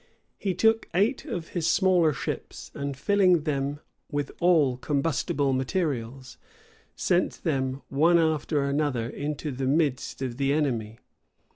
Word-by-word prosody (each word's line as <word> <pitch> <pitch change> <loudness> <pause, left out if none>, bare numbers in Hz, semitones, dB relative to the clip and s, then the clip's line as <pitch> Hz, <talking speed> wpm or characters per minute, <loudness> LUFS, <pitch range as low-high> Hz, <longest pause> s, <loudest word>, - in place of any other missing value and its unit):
He 190 -3 -1
took 225 0 +2
eight 225 +10 +1
of 175 - -5
his 170 -3 -2
smaller 180 -5 +4
ships, 125 - -6
and 140 -1 -4
filling 180 0 +3
them 145 -1 -2 0.3
with 145 -1 -2
all 155 -8 +3
combustible 140 0 0
materials, 130 -3 -2 0.6
sent 180 -1 0
them, 135 -4 -1
one 165 +5 +4
after 155 -2 +1
another, 140 -4 0
into 145 +3 -4
the 130 0 -3
midst 140 -2 0
of 125 -2 -4
the 140 0 +1
enemy. 115 -8 -1
145 Hz, 130 wpm, -26 LUFS, 135-170 Hz, 0.6 s, smaller